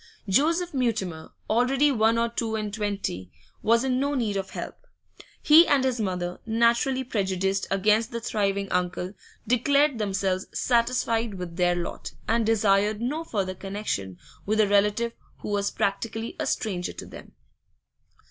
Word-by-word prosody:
Joseph 330 - +2
Mutimer, 205 - -2 0.2
already 260 +6 +3
one 225 -2 +3
or 230 0 +2
two 230 -1 -3
and 210 -2 -3
twenty, 200 - -3 0.3
was 230 +2 +3
in 255 -1 +1
no 285 +1 0
need 225 -6 -1
of 195 -1 -3
help; - - -8 0.6
he 320 +3 +8
and 280 -2 +3
his 255 -2 0
mother, 180 -3 -3
naturally 235 +4 +2
prejudiced 195 -4 -1
against 210 +3 +2
the 235 - -4
thriving 200 -3 -1
uncle, 180 +1 -1 0.3
declared 280 +2 +3
themselves 190 -2 -1
satisfied 235 -2 +1
with 180 -2 -6
their 175 0 +2
lot, 175 -1 -5
and 225 -1 +1
desired 210 -1 +2
no 285 +8 -2
further 195 -10 -2
connection 190 - -4 0.3
with 215 +2 0
a 215 - +5
relative 210 +3 +2 0.3
who - - -5
was 200 -1 0
practically 225 +3 -2
a - - -1
stranger 180 -5 -2
to - - -8
them. - - -12
215 Hz, 150 wpm, -26 LUFS, 195-235 Hz, 0.6 s, he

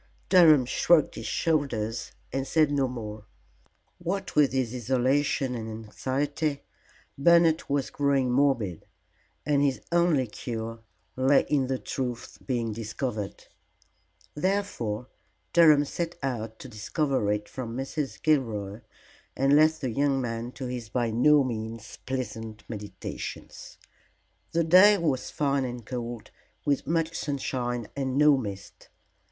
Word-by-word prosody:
Durham 160 -8 +7
shrugged 160 +4 +3
his - - -6
shoulders 120 -9 -1 0.2
and 135 0 -2
said 155 -2 +3
no 140 -2 +2
more. 110 -4 -7 0.7
What 190 +3 -3
with 150 -2 +5
his 130 -3 -1
isolation 130 +2 +1
and 115 -2 -5
anxiety, 140 +7 -2 0.6
Bernard 170 +1 +5
was 140 -1 0
growing 140 -3 +1
morbid, 125 - +1 0.6
and 145 -1 +2
his 140 -2 +1
only 170 -6 +3
cure 115 0 -6 0.4
lay 135 +2 +4
in 140 -3 +2
the 130 0 -1
truth 125 -2 -5
being 120 -4 -1
discovered. 110 -1 -4 0.9
Therefore 150 - -1 0.5
Durham 155 -4 +6
set 170 +3 -4
out 115 -4 -3
to - - -10
discover 120 0 -1
it 105 0 -2
from 120 -2 -6
Mrs. 135 +1 -4
Gilroy, 115 -9 0 0.6
and 135 +1 +4
left 155 +1 +4
the 130 -4 -1
young 140 +2 +1
man 115 -1 -3
to 130 - -6
his 125 -3 -5
by 120 -1 0
no 145 +5 +5
means 115 -2 -5
pleasant 110 -4 -4
meditations. 105 -4 -7 0.7
The 170 0 +2
day 185 +6 +7
was 150 -8 -1
fine 140 -2 0
and 120 -3 -5
cold, 120 -2 -6 0.3
with 140 -3 0
much 165 +1 0
sunshine 125 -5 -2
and 135 -1 -2
no 150 0 +6
mist. 100 -7 -7
130 Hz, 125 wpm, -27 LUFS, 115-145 Hz, 0.9 s, Durham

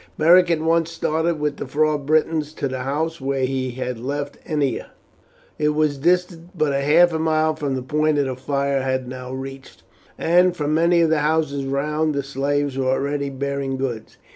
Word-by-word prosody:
Beric 175 +3 +6
at 165 -2 +1
once 165 0 +2
started 160 0 -1
with 150 -1 -1
the - - -5
four 155 +1 +1
Britons 155 +1 0
to 140 - -2
the 130 -1 -4
house 150 +4 -2
where 135 -1 0
he 130 0 -2
had 125 -1 -4
left 145 +3 -4
Ennia. 145 -6 -1 0.7
It 150 0 +1
was 150 -2 +1
distant 175 +2 0
but 155 -3 +1
half 155 +5 +4
a 160 - -1
mile 155 0 +1
from 145 -3 -2
the 130 - -4
point 150 +2 +1
the 135 -3 0
fire 140 +1 -1
had 130 -1 -2
now 125 0 -7
reached, 135 +1 -8 0.3
and 180 +1 +3
from 150 0 -1
many 170 +2 +3
of 165 -1 +3
the 160 - +3
houses 150 -2 0
round 150 +3 -1
the 140 - -1
slaves 140 0 -1
were 130 - 0
already 140 +2 -1
bearing 140 0 -3
goods. 125 -4 -4
145 Hz, 185 wpm, -22 LUFS, 135-160 Hz, 0.7 s, Beric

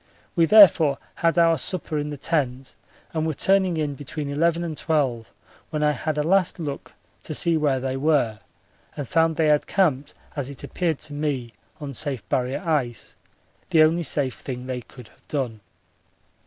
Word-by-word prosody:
We 165 - +4
therefore 165 -9 +7 0.2
had 165 0 +1
our 165 -1 +4
supper 170 -5 -1
in 150 0 -3
the 145 - -6
tent 135 -4 -2 0.4
and 160 -1 -1
were 155 - -2
turning 190 -1 +2
in 150 -2 -1
between 145 +1 -5
eleven 165 +4 +1
and 165 -2 -4
twelve 135 -8 -1 0.4
when 150 -1 -2
I 150 - +4
had 150 +2 -3
a 150 - +1
last 185 +2 +2
look 150 -5 -6 0.3
to 155 - -6
see 170 +2 +2
where 145 -4 +1
they 130 0 -3
were 135 -7 +1 0.6
and 145 - -4
found 165 +2 +2
they 155 -1 +2
had 150 -1 +2
camped 150 -8 +1 0.2
as 140 -3 -3
it 140 - -10
appeared 165 -5 -1
to 150 - -5
me 140 -6 -3 0.3
on 145 -2 -6
safe 130 -6 -2
Barrier 130 +8 -1
ice, 125 -8 -1 0.5
the 160 -1 +6
only 165 +2 +3
safe 140 -5 -1
thing 125 -2 -6
they 130 -1 -4
could 125 -1 -14
have - - -28
done. 125 -7 -3
150 Hz, 180 wpm, -24 LUFS, 135-165 Hz, 0.6 s, therefore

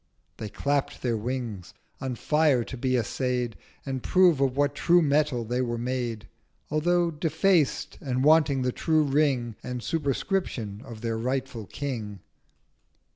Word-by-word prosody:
They 110 - -5
clapp'd 140 +7 -1
their 120 -2 +1
Wings, 110 -6 -4 0.2
on 130 -2 -3
Fire 150 -2 +2
to 130 - -7
be 130 0 0
assay'd 125 0 -1 0.3
And 135 -2 -3
prove 180 -4 +4
of 135 -1 +1
what 145 0 +2
true 175 +4 +4
Metal 145 -5 +1
they 125 +3 -1
were 120 -2 -1
made, 120 -3 -3 0.4
Although 170 +3 +2
defaced, 160 0 +1
and 130 -2 -1
wanting 145 -3 +4
the 125 - +1
true 155 +3 +2
Ring 135 -6 +1
And 125 -1 -5
Superscription 140 - -2
of 115 -3 -9
their 115 -1 -2
rightful 125 -3 -3
King. 110 -9 -5
130 Hz, 140 wpm, -27 LUFS, 120-150 Hz, 0.4 s, prove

